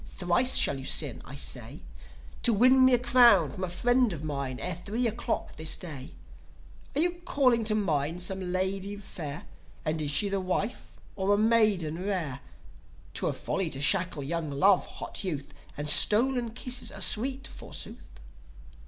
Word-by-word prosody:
Thrice 180 +8 0
shall 135 - +4
you 135 - -9
sin, - - -2
I - - -10
say, - - -6 0.6
To 235 - +4
win 255 +5 +5
me 260 -1 +6
a - - +2
crown 240 - +4
from 185 - -7
a 185 - -2
friend 245 +6 +1
of 155 -2 -7
mine, 140 -4 -4
Ere 180 - -3
three 205 +8 -3
o' 230 - +1
the - - -12
clock 235 0 -4
this 160 0 0
day. 150 -8 -9 0.8
Are 295 - +4
you 350 +1 0
calling 250 -7 +2
to 215 0 +2
mind 165 -3 -1
some 185 -1 -4
lady 190 +2 -2
fair? 165 -6 -8 0.4
And 155 0 -2
is 150 - -2
she 175 +8 +4
a 195 0 -1
wife 190 +5 -3 0.3
or 200 +1 +1
a - - -1
maiden 205 -7 +1
rare? 170 -10 -3 0.7
'Twere - - -1
folly 195 -4 -2
to 135 - -6
shackle 170 -1 0
young 165 +2 -3
love, 180 +7 +2
hot - - -8
Youth; 150 -7 -5 0.2
And 145 0 -4
stolen 230 - +6
kisses 245 +2 -4
are - - -10
sweet, 265 +5 +2
forsooth!" - - -9
190 Hz, 170 wpm, -28 LUFS, 160-235 Hz, 0.8 s, me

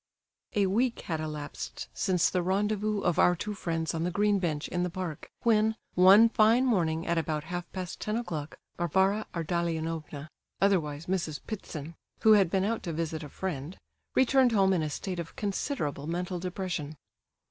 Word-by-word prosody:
A 205 -2 +3
week 235 +6 +1
had 160 -3 -3
elapsed 150 -2 -5
since 185 -3 +1
the 180 - +1
rendezvous 205 +3 0
of 175 -1 +1
our 180 - +5
two 210 +5 -4
friends 165 -4 -2
on 165 - -2
the 175 - 0
green 205 +2 +2
bench 160 -5 -2
in 175 - -2
the 180 - 0
park, 175 -4 -5
when, 220 -1 +3 0.2
one 195 +5 +8
fine 230 +3 +4
morning 170 -9 +1
at 170 -1 +1
about 155 -2 -2
half 175 +1 -5
past 185 -2 -5
ten 215 +1 -1
o'clock, 160 -10 -5 0.2
Varvara 190 +4 +2
Ardalionovna, 165 -3 -2 0.3
otherwise 165 -6 +1
Mrs. 175 -5 -2
Ptitsin, 165 -7 -6 0.3
who 220 - +6
had 195 -4 +5
been 190 +2 +1
out 225 +3 -1
to 170 - -4
visit 160 0 -3
a 150 - -8
friend, 165 -1 -5 0.4
returned 260 -1 +4
home 195 -2 +4
in 175 - +1
a 155 - -1
state 180 +4 -4
of 170 - -6
considerable 190 - -2
mental 180 +2 -2
depression. 175 -4 -4
180 Hz, 170 wpm, -29 LUFS, 160-205 Hz, 0.4 s, one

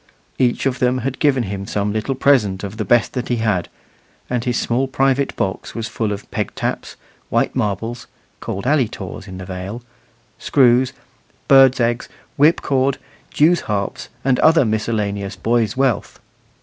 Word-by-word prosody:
Each 125 0 +1
of 130 -1 0
them 125 0 +2
had 135 -1 -3
given 135 -4 +2
him 100 -1 -5
some 105 0 -1
little 110 +5 -2
present 115 -9 +2
of 100 +1 -6
the 110 - -1
best 120 +3 +3
that 125 -2 -3
he 120 - 0
had, 110 -6 0 0.6
and 125 -2 0
his 120 -1 0
small 125 +3 0
private 135 +1 +1
box 95 -1 -3
was 115 -1 -3
full 110 -2 -2
of 100 0 -6
peg - - -3
taps, - - -3 0.3
white - - 0
marbles 115 +4 -2 0.3
(called 100 - -5
"alley 135 -3 +3
taws" 95 -2 -8
in 95 -1 -8
the 95 - -7
Vale), 95 +5 -6 0.6
screws, 130 -2 +3 0.5
birds' 135 -1 +6
eggs, 120 0 0 0.3
whip 150 +4 +4
cord, 135 0 +1 0.3
jews 165 +3 +3
harps, 100 -1 -2 0.2
and 130 -2 +2
other 160 -3 +5
miscellaneous 105 -2 -2
boys' 115 +3 0
wealth. 135 -4 0
120 Hz, 160 wpm, -19 LUFS, 105-130 Hz, 0.6 s, birds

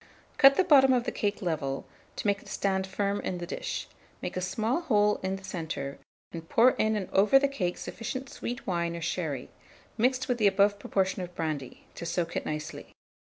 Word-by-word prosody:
Cut 275 -1 +8
the 380 - +4
bottom 270 -5 +6
of 245 -2 +2
the - - -2
cake 205 0 -2
level, 140 -6 -2 0.3
to - - -5
make 200 -1 +2
it - - -17
stand 190 -1 -1
firm 200 +1 -1
in 180 - -3
the 175 - -5
dish; - - -4 0.3
make - - -5
a 185 - -1
small 220 - 0
hole 210 -8 +3
in 190 0 -1
the 195 - -10
centre, 155 -6 -5 0.3
and 165 -1 -8
pour 245 +3 +6
in 220 -2 +1
and 200 -3 -2
over 205 +7 +6
the 280 +1 +3
cake 190 -11 -2
sufficient 255 +4 -5
sweet 245 -2 -6
wine 170 -2 -1
or 170 - -6
sherry, 160 -6 -3 0.5
mixed 255 +3 +2
with 245 -1 0
the 210 - +5
above 200 +1 +3
proportion 190 -1 0
of 180 0 -7
brandy, 150 -5 -4
to 170 - -6
soak 170 0 -2
it - - -2
nicely. 150 0 -6
195 Hz, 205 wpm, -29 LUFS, 170-225 Hz, 0.5 s, Cut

